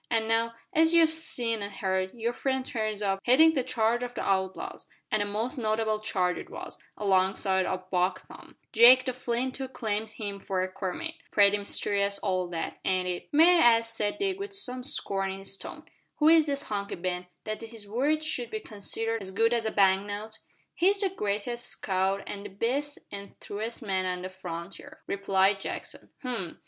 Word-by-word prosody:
An' 225 Hz, -1 st, +1 dB
now, 230 Hz, +1 st, +1 dB, 0.2 s
as 325 Hz, +1 st, +4 dB
you've 325 Hz, -1 st, +6 dB
seen 235 Hz, -8 st, 0 dB
an' 200 Hz, -, -3 dB
heard, 190 Hz, -1 st, -1 dB
your 235 Hz, +1 st, -1 dB
friend 265 Hz, 0 st, -1 dB
turns 215 Hz, -4 st, -2 dB
up 195 Hz, -1 st, +1 dB
headin' 315 Hz, +6 st, +6 dB
a 265 Hz, -, +2 dB
charge 240 Hz, -1 st, +1 dB
of 245 Hz, 0 st, -5 dB
the -, -, -3 dB
outlaws 190 Hz, -1 st, -2 dB, 0.2 s
an' 215 Hz, -, +2 dB
a -, -, +1 dB
most 225 Hz, +7 st, -2 dB
notable 215 Hz, -1 st, 0 dB
charge 185 Hz, -4 st, 0 dB
it -, -, -9 dB
was -, -, -8 dB, 0.2 s
alongside 190 Hz, -1 st, +2 dB
o' 185 Hz, 0 st, -3 dB
Buck 180 Hz, 0 st, 0 dB
Tom. -, -, -14 dB, 0.2 s
Jake 250 Hz, +3 st, +8 dB
the 255 Hz, -, -1 dB
Flint 250 Hz, +1 st, -2 dB
too 265 Hz, -1 st, -4 dB
claims 220 Hz, -3 st, -3 dB
him 200 Hz, -2 st, -5 dB
for 190 Hz, -1 st, -1 dB
a 185 Hz, -, -4 dB
comrade. 195 Hz, -, -4 dB, 0.2 s
Pretty 205 Hz, -1 st, +5 dB
mysterious 200 Hz, 0 st, -1 dB
all 185 Hz, -3 st, -1 dB
that, 170 Hz, -2 st, -4 dB
ain't 185 Hz, -1 st, +1 dB
it?" 180 Hz, -1 st, -4 dB
"May 335 Hz, +4 st, +6 dB
I 235 Hz, -4 st, +7 dB
ask," 230 Hz, 0 st, -4 dB
said 205 Hz, -1 st, -1 dB
Dick, 390 Hz, -1 st, -1 dB
with 400 Hz, 0 st, -4 dB
some 255 Hz, -10 st, -1 dB
scorn 195 Hz, -6 st, -1 dB
in -, -, -7 dB
his 195 Hz, 0 st, -6 dB
tone, -, -, -9 dB, 0.3 s
"who 300 Hz, -, +3 dB
is 320 Hz, -2 st, +6 dB
this 280 Hz, 0 st, -1 dB
Hunky 200 Hz, -1 st, -3 dB
Ben, 180 Hz, 0 st, -3 dB, 0.2 s
that 215 Hz, 0 st, -4 dB
his 225 Hz, -2 st, -10 dB
word 285 Hz, +8 st, +1 dB
should 285 Hz, -6 st, -1 dB
be 435 Hz, -, -3 dB
considered 225 Hz, -, -3 dB
as 190 Hz, -, -4 dB
good 225 Hz, +4 st, +2 dB
as 230 Hz, -2 st, 0 dB
a -, -, -1 dB
bank 195 Hz, 0 st, +3 dB
note?" 215 Hz, +2 st, -6 dB, 0.3 s
"He's 390 Hz, +3 st, +3 dB
the 390 Hz, -, +2 dB
greatest 235 Hz, -, -2 dB
scout 190 Hz, 0 st, 0 dB
an' 200 Hz, -, -5 dB
the 205 Hz, -, -7 dB
best 255 Hz, +9 st, -2 dB
an' 200 Hz, 0 st, -8 dB
truest 225 Hz, +4 st, -5 dB
man 190 Hz, -3 st, 0 dB
on 180 Hz, 0 st, -3 dB
the 185 Hz, -, -4 dB
frontier," 185 Hz, -, -8 dB
replied 195 Hz, 0 st, +2 dB
Jackson. -, -, -6 dB
"H'm! 235 Hz, -, -4 dB
215 Hz, 195 wpm, -28 LUFS, 195-250 Hz, 0.3 s, Jake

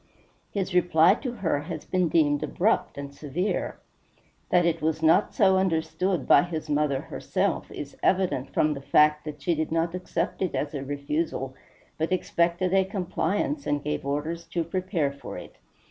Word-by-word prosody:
His 195 Hz, -2 st, -3 dB
reply 175 Hz, 0 st, +5 dB
to 250 Hz, +3 st, -4 dB
her 175 Hz, -11 st, -1 dB
has 155 Hz, +1 st, -6 dB
been 180 Hz, -2 st, +1 dB
deemed 145 Hz, -3 st, +3 dB
abrupt 215 Hz, -3 st, 0 dB
and 140 Hz, 0 st, -6 dB
severe. 155 Hz, +8 st, -2 dB, 0.7 s
That 175 Hz, -1 st, +4 dB
it 165 Hz, -1 st, +1 dB
was 160 Hz, 0 st, -1 dB
not 165 Hz, +6 st, +4 dB
so 190 Hz, -2 st, +5 dB
understood 165 Hz, -2 st, 0 dB
by -, -, +7 dB
his 160 Hz, -3 st, -4 dB
mother 145 Hz, -2 st, +1 dB
herself -, -, -2 dB
is -, -, -7 dB
evident 175 Hz, -8 st, +1 dB
from 150 Hz, 0 st, +2 dB
the 140 Hz, -, -7 dB
fact 150 Hz, +2 st, +3 dB
that 150 Hz, -2 st, -7 dB
she 170 Hz, -, +2 dB
did 160 Hz, 0 st, -2 dB
not 165 Hz, +1 st, 0 dB
accept 180 Hz, 0 st, -3 dB
it 185 Hz, -, -1 dB
as 145 Hz, +1 st, -2 dB
a 140 Hz, -2 st, -4 dB
refusal, 140 Hz, -1 st, -2 dB, 0.5 s
but 160 Hz, +3 st, -1 dB
expected 175 Hz, 0 st, +1 dB
a 195 Hz, 0 st, +5 dB
compliance, 195 Hz, -, -2 dB
and 145 Hz, 0 st, 0 dB
gave 150 Hz, 0 st, -2 dB
orders 150 Hz, +4 st, -3 dB
to 170 Hz, 0 st, -2 dB
prepare 170 Hz, -3 st, -1 dB
for 140 Hz, -, -8 dB
it. -, -, -11 dB
165 Hz, 170 wpm, -26 LUFS, 150-180 Hz, 0.7 s, by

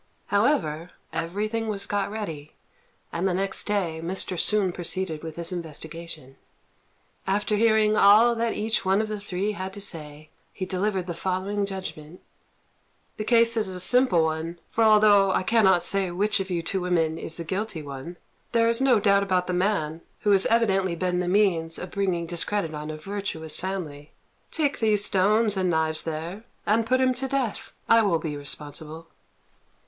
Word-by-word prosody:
However, 190 Hz, -, +1 dB, 0.2 s
everything 210 Hz, +7 st, -2 dB
was 200 Hz, -2 st, -2 dB
got 205 Hz, -1 st, -1 dB
ready, 165 Hz, -9 st, -6 dB, 0.6 s
and 175 Hz, +3 st, 0 dB
the 180 Hz, -, 0 dB
next 195 Hz, +1 st, -1 dB
day 185 Hz, -6 st, -1 dB
Mr. 185 Hz, +1 st, -1 dB
Sun 200 Hz, +1 st, +2 dB
proceeded 175 Hz, -2 st, -3 dB
with 160 Hz, -1 st, -7 dB
his 170 Hz, +1 st, -3 dB
investigation. 160 Hz, -4 st, -7 dB, 0.9 s
After 205 Hz, +2 st, +1 dB
hearing 215 Hz, -1 st, +3 dB
all 215 Hz, +4 st, +6 dB
that 230 Hz, -1 st, -1 dB
each 220 Hz, +1 st, -1 dB
one 190 Hz, +1 st, +2 dB
of 220 Hz, 0 st, -1 dB
the 215 Hz, -1 st, -4 dB
three 200 Hz, 0 st, -2 dB
had 190 Hz, -2 st, -5 dB
to 205 Hz, -, -6 dB
say, 155 Hz, -5 st, -5 dB, 0.2 s
he 185 Hz, -, -5 dB
delivered 190 Hz, 0 st, -1 dB
the 175 Hz, -, -4 dB
following 190 Hz, +3 st, -2 dB
judgment: 180 Hz, -4 st, -7 dB, 1.0 s
"The 215 Hz, -, -3 dB
case 230 Hz, +1 st, +4 dB
is 220 Hz, -3 st, +1 dB
a 185 Hz, -1 st, -3 dB
simple 190 Hz, -4 st, +4 dB
one; 160 Hz, +2 st, -3 dB
for 225 Hz, -, +1 dB
although 210 Hz, -2 st, +6 dB
I 185 Hz, -, +1 dB
cannot 190 Hz, -4 st, +3 dB
say 195 Hz, +1 st, +1 dB
which 200 Hz, +5 st, 0 dB
of 195 Hz, 0 st, -4 dB
you 170 Hz, -2 st, -2 dB
two 190 Hz, +3 st, -1 dB
women 165 Hz, -3 st, 0 dB
is 160 Hz, -, -6 dB
the 170 Hz, -, -5 dB
guilty 185 Hz, -1 st, -4 dB
one, 140 Hz, +5 st, -8 dB, 0.4 s
there 230 Hz, -1 st, +3 dB
is 230 Hz, +2 st, +1 dB
no 260 Hz, -4 st, +4 dB
doubt 200 Hz, -1 st, +3 dB
about 185 Hz, -2 st, 0 dB
the 180 Hz, -, -3 dB
man, 180 Hz, -4 st, 0 dB, 0.2 s
who 210 Hz, -, +2 dB
has 195 Hz, -1 st, +5 dB
evidently 195 Hz, -6 st, +2 dB
been 180 Hz, +1 st, -1 dB
the 180 Hz, -, -2 dB
means 180 Hz, -4 st, +1 dB
of 180 Hz, -, -7 dB
bringing 185 Hz, -4 st, -1 dB
discredit 170 Hz, 0 st, -1 dB
on 150 Hz, 0 st, -6 dB
a 155 Hz, -, -5 dB
virtuous 165 Hz, -3 st, -4 dB
family. 160 Hz, -6 st, -6 dB, 0.4 s
Take 295 Hz, -3 st, -1 dB
those 210 Hz, -2 st, +3 dB
stones 210 Hz, +3 st, +2 dB
and 185 Hz, -1 st, 0 dB
knives 160 Hz, -1 st, 0 dB
there 165 Hz, +6 st, -5 dB, 0.2 s
and 225 Hz, +2 st, +2 dB
put 255 Hz, +1 st, +2 dB
him 255 Hz, 0 st, +3 dB
to 260 Hz, +2 st, -3 dB
death. 265 Hz, -5 st, -2 dB, 0.2 s
I 230 Hz, 0 st, +6 dB
will 195 Hz, -6 st, +2 dB
be 155 Hz, -2 st, -4 dB
responsible." 150 Hz, +3 st, -3 dB
190 Hz, 175 wpm, -25 LUFS, 165-210 Hz, 1.0 s, all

